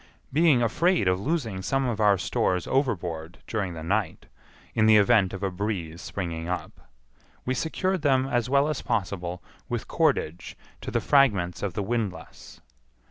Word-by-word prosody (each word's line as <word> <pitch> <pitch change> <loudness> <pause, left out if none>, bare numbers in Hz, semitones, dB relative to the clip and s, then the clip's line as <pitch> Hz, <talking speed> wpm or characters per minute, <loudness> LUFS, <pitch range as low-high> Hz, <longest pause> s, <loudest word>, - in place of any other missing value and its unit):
Being 150 -5 +4
afraid 150 - +2
of 90 0 +2
losing 115 - -2
some 135 +7 0
of 120 -4 -2
our 105 -2 +4
stores 90 0 0
overboard 90 - -1
during 100 -6 -3
the 80 - -7
night, 100 +5 -1 0.5
in 110 -1 +3
the 110 -1 +7
event 100 -2 +4
of 95 0 -6
a 95 - 0
breeze 90 -4 -4
springing 85 -3 -4
up, 90 - -6 0.6
we 130 - 0
secured 185 +6 -1
them 135 -2 +3
as 120 -3 -1
well 140 +2 +3
as 155 - -2
possible 90 -6 -3 0.3
with - - -3
cordage 85 +3 0 0.2
to - - -5
the - - 0
fragments 100 -11 +3
of 100 -3 -2
the 105 - -1
windlass. 105 -3 -5
105 Hz, 160 wpm, -26 LUFS, 90-130 Hz, 0.6 s, the